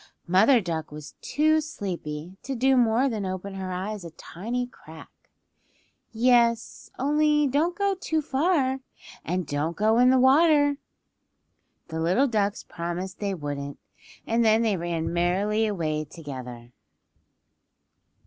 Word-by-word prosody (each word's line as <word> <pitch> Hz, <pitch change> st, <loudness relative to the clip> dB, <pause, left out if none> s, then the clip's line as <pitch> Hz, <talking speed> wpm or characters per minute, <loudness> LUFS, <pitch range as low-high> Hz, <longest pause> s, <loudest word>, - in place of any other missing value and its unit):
Mother 210 Hz, +9 st, +5 dB
Duck 165 Hz, -5 st, -4 dB
was 150 Hz, -1 st, -9 dB
too 310 Hz, +3 st, +2 dB
sleepy 180 Hz, -, -6 dB
to 270 Hz, -, -4 dB
do 265 Hz, +2 st, +3 dB
more 240 Hz, +1 st, +3 dB
than 220 Hz, -6 st, -2 dB
open 185 Hz, +1 st, -5 dB
her 190 Hz, -1 st, -5 dB
eyes 195 Hz, +2 st, -4 dB
a 170 Hz, -, -7 dB
tiny 230 Hz, +10 st, -5 dB
crack. 160 Hz, -10 st, -14 dB, 1.0 s
"Yes; 235 Hz, 0 st, +2 dB
only 300 Hz, +2 st, +2 dB
don't 305 Hz, +6 st, 0 dB
go 400 Hz, -1 st, +1 dB
too 320 Hz, -4 st, -2 dB
far, 275 Hz, -2 st, +1 dB, 0.4 s
and 180 Hz, +1 st, -2 dB
don't 145 Hz, +4 st, -2 dB
go 220 Hz, +2 st, +3 dB
in 250 Hz, +1 st, +6 dB
the 260 Hz, -, +5 dB
water." 290 Hz, +2 st, +4 dB, 1.1 s
The 160 Hz, 0 st, -4 dB
little 185 Hz, +12 st, +2 dB
ducks 205 Hz, -4 st, -1 dB
promised 175 Hz, +2 st, -5 dB
they 200 Hz, -2 st, -2 dB
wouldn't, 145 Hz, -3 st, -5 dB, 0.5 s
and 230 Hz, +1 st, +1 dB
then 220 Hz, +1 st, +4 dB
they 215 Hz, -3 st, +1 dB
ran 170 Hz, -1 st, -3 dB
merrily 200 Hz, +6 st, +1 dB
away 155 Hz, -6 st, -2 dB
together. 130 Hz, -6 st, -9 dB
210 Hz, 130 wpm, -26 LUFS, 170-260 Hz, 1.1 s, in